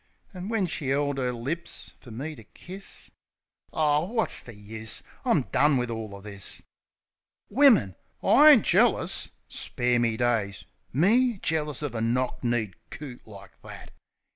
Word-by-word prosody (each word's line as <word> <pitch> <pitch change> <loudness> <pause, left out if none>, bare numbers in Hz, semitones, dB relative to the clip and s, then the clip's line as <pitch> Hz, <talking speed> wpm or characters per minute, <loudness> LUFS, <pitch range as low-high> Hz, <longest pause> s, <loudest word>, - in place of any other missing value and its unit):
An' 185 +2 -6
when 225 -4 +1
she 155 -5 -3
'eld 140 0 0
'er 125 -1 0
lips 135 +9 -5
fer 125 - -14
me 135 +8 -5
to 115 - -13
kiss.... 190 - -9 0.6
Ar, 150 +1 +1
wot's 225 +1 +1
the 120 - -12
use? 110 +2 -4 0.2
I'm - - +2
done 145 -1 +4
wiv 125 -1 -1
all 110 -3 -5
o' 100 - -11
this! 100 -1 -6 0.9
Wimmin!... 240 - +5 0.3
Oh, - - 0
I 300 +2 +9
ain't 275 -9 +7
jealous! - - +3 0.2
Spare 120 0 0
me 115 -2 +1
daysi 115 -5 0 0.3
Me? 225 - +3
Jealous 150 -3 -1
uv 145 -5 -3
a 115 - -3
knock 125 +3 -1
kneed 120 -5 0 0.2
coot 130 -7 -9
like 100 -3 -14
that! - - -11
130 Hz, 155 wpm, -27 LUFS, 115-165 Hz, 0.9 s, I